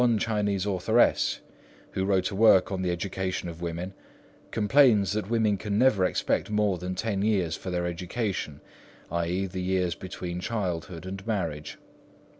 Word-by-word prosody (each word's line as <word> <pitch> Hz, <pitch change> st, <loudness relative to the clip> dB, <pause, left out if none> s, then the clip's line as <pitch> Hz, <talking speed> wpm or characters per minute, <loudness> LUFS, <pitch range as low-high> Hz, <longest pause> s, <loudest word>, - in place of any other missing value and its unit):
One 120 Hz, -2 st, +4 dB
Chinese 105 Hz, -3 st, 0 dB
authoress, 105 Hz, +4 st, +2 dB, 0.5 s
who 95 Hz, -, -1 dB
wrote 95 Hz, 0 st, +1 dB
a -, -, -4 dB
work 100 Hz, -3 st, +5 dB
on 95 Hz, -1 st, -2 dB
the 90 Hz, -, 0 dB
education 95 Hz, +1 st, -2 dB
of 85 Hz, 0 st, -8 dB
women, 85 Hz, +2 st, -4 dB, 0.6 s
complains 110 Hz, -3 st, +4 dB
that 105 Hz, -1 st, -2 dB
women 110 Hz, -3 st, +2 dB
can 105 Hz, 0 st, -2 dB
never 110 Hz, -6 st, +4 dB
expect 90 Hz, -, 0 dB
more 105 Hz, -3 st, +1 dB
than 90 Hz, +1 st, -4 dB
ten 105 Hz, -2 st, -1 dB
years 95 Hz, -6 st, +1 dB
for 95 Hz, -, -7 dB
their 90 Hz, -1 st, -1 dB
education, 85 Hz, -2 st, -3 dB, 0.5 s
i.e. 85 Hz, +3 st, 0 dB
the 95 Hz, 0 st, -5 dB
years 90 Hz, -1 st, 0 dB
between 90 Hz, -1 st, -6 dB
childhood 90 Hz, -4 st, -3 dB
and 95 Hz, +1 st, -6 dB
marriage. 80 Hz, -9 st, -3 dB
95 Hz, 155 wpm, -27 LUFS, 90-105 Hz, 0.6 s, work